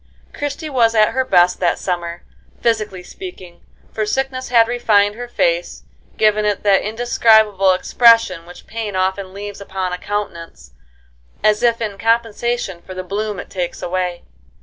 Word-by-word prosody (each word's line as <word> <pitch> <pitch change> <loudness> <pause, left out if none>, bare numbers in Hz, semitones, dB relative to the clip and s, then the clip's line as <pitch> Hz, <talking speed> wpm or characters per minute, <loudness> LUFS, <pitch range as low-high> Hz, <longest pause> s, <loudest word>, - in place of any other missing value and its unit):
Christie 290 +2 -4
was 235 -5 +2
at 215 -1 +5
her 260 - 0
best 180 -7 +3
that 175 -2 +1
summer, 175 -2 -4 0.4
physically 215 -5 -1
speaking, 185 - -10 0.3
for 215 - -1
sickness 260 +4 -2
had 230 -2 +5
refined 210 -4 +2
her 245 +3 -7
face, - - -1 0.3
giving 215 -1 +3
it 205 -2 -1
that 200 -2 +4
indescribable 220 -3 +3
expression 195 -4 +3
which 175 - -13
pain 220 -3 -5
often 190 +1 -1
leaves 200 +1 -8
upon 190 -2 -4
a 180 - -4
countenance 170 - -6 0.7
as 215 0 +3
if 235 -1 +2
in 205 -3 -4
compensation 230 -3 -1
for 185 - -10
the 185 - -5
bloom 205 +2 -3
it - - -9
takes 180 -2 -4
away. 180 -1 -2
210 Hz, 150 wpm, -18 LUFS, 185-230 Hz, 0.7 s, at